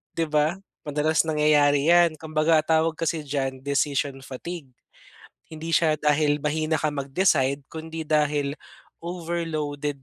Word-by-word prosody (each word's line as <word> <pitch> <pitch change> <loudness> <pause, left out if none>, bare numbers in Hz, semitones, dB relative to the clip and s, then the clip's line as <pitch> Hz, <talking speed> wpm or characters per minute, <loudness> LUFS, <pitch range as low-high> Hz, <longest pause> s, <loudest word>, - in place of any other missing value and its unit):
'Di 165 - 0
ba? 155 +3 +1 0.2
Madalas 150 +1 +1
nangyayari 150 -2 +3
'yan 170 -2 +4
kumbaga, 155 +1 +1
ang 155 - 0
tawag 160 0 +2
kasi 165 -1 -1
diyan 135 -2 -3
decision 140 -1 -1
fatigue. 135 0 -8 0.7
Hindi 160 +1 -7
siya 160 -2 +3
dahil 150 -1 +2
mahina 155 +1 0
ka 155 - 0
mag-decide, 140 -1 +1
kundi 160 0 -6
dahil 150 -1 0 0.5
overloaded 155 -5 -4
155 Hz, 125 wpm, -25 LUFS, 145-160 Hz, 0.7 s, yan